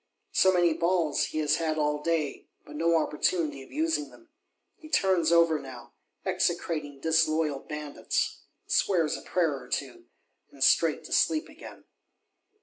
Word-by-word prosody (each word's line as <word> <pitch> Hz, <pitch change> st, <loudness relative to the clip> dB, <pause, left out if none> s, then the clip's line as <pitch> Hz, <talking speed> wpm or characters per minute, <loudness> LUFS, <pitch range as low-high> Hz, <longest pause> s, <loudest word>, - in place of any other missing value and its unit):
So 190 Hz, -, +4 dB
many 175 Hz, -2 st, +3 dB
balls 170 Hz, -2 st, +1 dB
he -, -, -6 dB
has 150 Hz, 0 st, +2 dB
had 160 Hz, -2 st, -1 dB
all 150 Hz, -1 st, 0 dB
day; 155 Hz, -3 st, -2 dB, 0.2 s
but 145 Hz, -, -11 dB
no 165 Hz, +2 st, +2 dB
opportunity 150 Hz, -2 st, -1 dB
of 135 Hz, -, -14 dB
using 315 Hz, 0 st, -1 dB
them: 340 Hz, -1 st, -19 dB, 0.5 s
he 310 Hz, -, -14 dB
turns 185 Hz, -, +2 dB
over 165 Hz, -2 st, +4 dB
now, 120 Hz, -3 st, -11 dB, 0.3 s
execrating 170 Hz, -6 st, -1 dB
disloyal 160 Hz, -1 st, +1 dB
bandits; 150 Hz, -1 st, -3 dB, 0.3 s
swears 165 Hz, -5 st, +1 dB
a -, -, -7 dB
prayer 165 Hz, -5 st, 0 dB
or -, -, -13 dB
two, 355 Hz, 0 st, -4 dB, 0.5 s
and -, -, -4 dB
straight -, -, +3 dB
to -, -, -6 dB
sleep 310 Hz, 0 st, +2 dB
again. -, -, -12 dB
160 Hz, 145 wpm, -28 LUFS, 150-180 Hz, 0.5 s, So